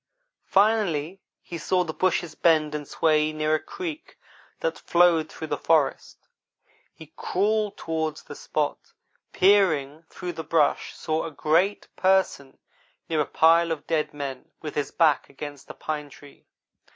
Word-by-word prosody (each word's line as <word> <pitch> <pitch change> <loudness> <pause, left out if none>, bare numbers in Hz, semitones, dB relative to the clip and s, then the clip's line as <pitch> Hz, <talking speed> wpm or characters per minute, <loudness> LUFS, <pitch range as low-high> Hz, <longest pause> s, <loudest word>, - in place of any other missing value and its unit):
Finally 195 -5 +2 0.2
he 170 - -7
saw 180 +3 +1
the 160 -2 -5
bushes 180 -2 0
bend 155 -3 +2
and 150 -2 -5
sway 155 -1 +2
near 155 0 0
a 155 - +2
creek 350 - -7 0.4
that - - -2
flowed 170 -2 +3
through 160 - -7
the - - -2
forest. 155 -4 0 0.6
He 160 -1 -15
crawled 210 +2 0
toward 160 -1 -2
the - - -10
spot, - - -2
and - - -37
peering 165 -6 +3
through 180 -1 -6
the 160 - -6
brush 160 -3 +1
saw 155 0 -2
a - - -4
great 170 +7 +1
Person 185 -8 +1 0.5
near 160 -2 +1
a 145 - -1
pile 165 +1 +4
of 155 -3 -4
dead 155 -2 0
men, 140 -3 -6
with 155 -2 -6
his 145 - -2
back 155 -5 +2
against 145 0 -9
a - - -8
pine 150 -2 -4
tree. 145 0 -17
160 Hz, 150 wpm, -25 LUFS, 150-180 Hz, 0.6 s, pile